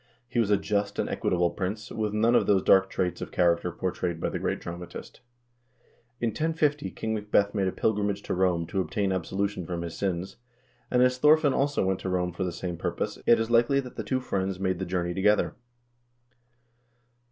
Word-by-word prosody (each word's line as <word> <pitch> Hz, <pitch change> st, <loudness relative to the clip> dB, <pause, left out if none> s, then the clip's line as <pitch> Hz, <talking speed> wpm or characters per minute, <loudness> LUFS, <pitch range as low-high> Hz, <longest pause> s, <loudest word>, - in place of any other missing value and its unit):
He 120 Hz, -, -1 dB
was 110 Hz, -3 st, +2 dB
a 105 Hz, -, +4 dB
just 100 Hz, -1 st, -1 dB
and -, -, 0 dB
equitable 90 Hz, -1 st, 0 dB
prince, 105 Hz, +3 st, -4 dB
with 105 Hz, -1 st, -2 dB
none 110 Hz, +3 st, +2 dB
of -, -, +3 dB
those 95 Hz, -2 st, +3 dB
dark 95 Hz, 0 st, +5 dB
traits 90 Hz, -1 st, -2 dB
of -, -, -5 dB
character 85 Hz, 0 st, +2 dB
portrayed 90 Hz, -1 st, -3 dB
by -, -, -1 dB
the -, -, -3 dB
great -, -, -1 dB
dramatist. 85 Hz, 0 st, -8 dB, 1.0 s
In 120 Hz, -, +1 dB
1050 150 Hz, +1 st, 0 dB
King 110 Hz, 0 st, -4 dB
Macbeth 105 Hz, -1 st, +1 dB
made 100 Hz, -3 st, +1 dB
a -, -, 0 dB
pilgrimage 100 Hz, -1 st, 0 dB
to -, -, -3 dB
Rome 90 Hz, -2 st, +1 dB
to 95 Hz, +3 st, -1 dB
obtain 95 Hz, +3 st, -1 dB
absolution 95 Hz, +2 st, -2 dB
from 85 Hz, -1 st, -3 dB
his 85 Hz, -1 st, -6 dB
sins, 95 Hz, -1 st, -3 dB, 0.5 s
and 125 Hz, 0 st, +4 dB
as 125 Hz, 0 st, +2 dB
Thorfinn 150 Hz, 0 st, +5 dB
also 140 Hz, -6 st, +1 dB
went 95 Hz, 0 st, 0 dB
to 95 Hz, -, -4 dB
Rome 90 Hz, -1 st, -1 dB
for 95 Hz, -, -3 dB
the 90 Hz, -, -2 dB
same 85 Hz, 0 st, -5 dB
purpose, -, -, -3 dB
it 120 Hz, -, +6 dB
is 115 Hz, +1 st, -2 dB
likely 120 Hz, +4 st, +4 dB
that 125 Hz, -2 st, -6 dB
the -, -, -4 dB
two 130 Hz, -, 0 dB
friends 95 Hz, -6 st, -2 dB
made 95 Hz, -2 st, -1 dB
the 95 Hz, -, -2 dB
journey 90 Hz, -1 st, -1 dB
together. 105 Hz, +3 st, +2 dB
95 Hz, 200 wpm, -27 LUFS, 90-110 Hz, 1.0 s, it